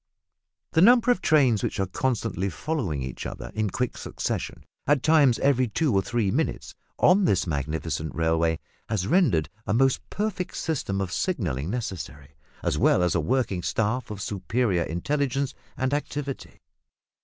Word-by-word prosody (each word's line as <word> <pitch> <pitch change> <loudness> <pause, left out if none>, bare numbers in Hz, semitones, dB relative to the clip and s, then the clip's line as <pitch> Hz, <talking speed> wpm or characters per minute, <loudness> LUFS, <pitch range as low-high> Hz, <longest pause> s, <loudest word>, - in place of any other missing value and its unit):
The 160 - +3
number 245 +4 +6
of 245 - +1
trains 130 -9 +4
which - - -2
are 95 - +2
constantly 100 -2 -1
following 95 - -2
each 65 -1 -5
other - - -7
in 110 -1 0
quick 125 +5 -2
succession - - -4 0.2
(at 145 -2 +3
times 150 -6 +5
every 130 -2 +2
two 135 +4 0
or 95 - +3
three 110 -1 0
minutes) - - -2 0.2
on 190 +2 +5
this 100 - +2
magnificent 80 0 -3
railway 80 0 +1 0.3
has 105 -5 0
rendered 130 - +3 0.2
a 105 - +1
most 135 +2 +3
perfect 205 -3 -3
system 115 -11 -2
of 95 -2 -3
signalling 90 - -1
necessary, 90 - -5 0.3
as - - 0
well 90 - +4
as 90 - +2
a - - +2
working 120 -8 0
staff 110 +6 -1
of 105 -1 -5
superior 105 -1 0
intelligence 135 - -1 0.2
and 130 +1 0
activity. 145 -1 -4
115 Hz, 155 wpm, -26 LUFS, 90-140 Hz, 0.3 s, number